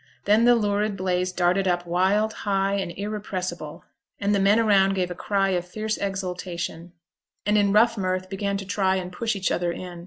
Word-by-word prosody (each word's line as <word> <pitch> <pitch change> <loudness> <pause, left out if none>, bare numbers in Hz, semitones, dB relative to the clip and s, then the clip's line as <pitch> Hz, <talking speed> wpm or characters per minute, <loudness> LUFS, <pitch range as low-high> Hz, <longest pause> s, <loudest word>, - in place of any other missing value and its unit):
Then 215 +3 +4
the 245 0 +6
lurid 205 -2 0
blaze 185 -1 0
darted 185 +2 +1
up 175 -1 0
wild, 190 +5 +1
high, 195 -1 0
and 195 -3 -2
irrepressible; 185 -5 -5 0.3
and 200 +1 +1
the 200 - +2
men 200 +3 +4
around 195 -3 +4
gave 180 -1 -1
a - - -2
cry 195 +2 0
of 180 -2 0
fierce 215 +4 -3
exultation, 180 -3 -4 0.5
and 210 +1 +2
in 200 -1 +3
rough 230 +2 +4
mirth 185 0 -1
began 200 +1 -2
to 195 - -6
try 190 -1 +1
and 180 -1 -4
push 225 +4 -2
each 195 -1 -1
other 175 -1 0
in. 175 0 -7
195 Hz, 190 wpm, -24 LUFS, 180-205 Hz, 0.5 s, the